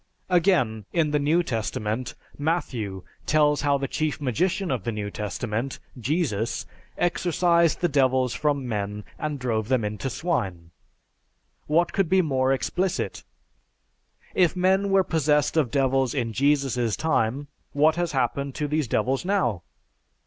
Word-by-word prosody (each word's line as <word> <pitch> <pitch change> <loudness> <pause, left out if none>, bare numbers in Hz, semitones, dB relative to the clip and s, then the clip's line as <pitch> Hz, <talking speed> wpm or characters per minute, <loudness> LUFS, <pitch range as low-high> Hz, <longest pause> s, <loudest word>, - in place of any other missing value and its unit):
Again, 160 - +2
in 160 -3 +1
the 150 - +2
New 155 +5 +2
Testament, 110 -2 -3 0.2
Matthew 125 - -2 0.2
tells 150 -2 +3
how 140 -1 +2
the 135 0 -3
chief 155 +1 -2
magician 175 - 0
of 125 -7 -1
the 115 - -2
New 105 -2 -4
Testament, 110 +5 -3 0.2
Jesus, 125 - -1 0.3
exorcised 170 -1 +2
the 175 - +3
devils 130 -4 +2
from 140 -3 0
men 105 -2 -3 0.2
and 150 -1 -2
drove 115 -4 -1
them 125 -4 +1
into 105 +6 -3
swine. 95 - -2 1.0
What 170 +3 +2
could 195 -5 +1
be 190 0 +4
more 130 -4 +1
explicit? 180 +7 -1 1.1
If 180 -2 +3
men 190 +2 +2
were 195 -1 +4
possessed 150 -4 +1
of 150 -6 +2
devils 135 0 +1
in 115 -4 -1
Jesus' 135 -4 +1
time, 140 -3 0 0.3
what 155 +2 +4
has 175 -1 0
happened 135 +1 -1
to 150 - -1
these 150 -2 0
devils 130 +5 0
now? 125 - 0
140 Hz, 140 wpm, -25 LUFS, 120-160 Hz, 1.1 s, be